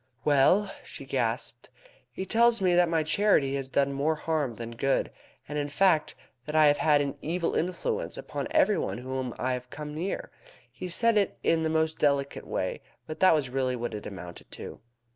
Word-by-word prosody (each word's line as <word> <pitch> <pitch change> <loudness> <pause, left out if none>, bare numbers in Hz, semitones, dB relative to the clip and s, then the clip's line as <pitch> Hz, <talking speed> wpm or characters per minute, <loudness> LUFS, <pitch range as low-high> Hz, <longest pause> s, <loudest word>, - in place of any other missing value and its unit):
"Well?" 150 +8 +4
she - - -9
gasped. - - -2 0.4
"He 190 - -5
tells 235 +4 +4
me 185 -2 +2
that 175 -1 +4
my 165 -1 +1
charity 155 -5 +2
has 135 -1 -3
done 140 +1 +1
more 145 +3 +1
harm 150 -6 -1
than 115 +1 -6
good, 135 +4 0 0.4
and 150 +1 -3
in 145 0 -2
fact, 160 0 +2 0.3
that 150 - -4
I 155 -1 +6
have 145 0 +4
had 150 -2 +4
an 140 0 -3
evil 170 +2 -1
influence 450 - -2
upon - - -5
every 295 - +3
one - - -3
whom 130 0 -4
I 130 +1 -1
have 125 0 -6
come 150 +1 -7
near. 175 +6 -4 0.4
He 180 - -7
said 230 +5 +3
it 200 - -1
in 165 -1 +2
the 160 - 0
most 160 0 0
delicate 140 -1 0
way, - - -2 0.2
but 155 - -7
that 185 -3 +6
was 135 -5 -1
really 130 -1 0
what 120 -1 -4
it 105 - -6
amounted 90 -3 -9
to." - - -8
150 Hz, 195 wpm, -28 LUFS, 135-180 Hz, 0.4 s, I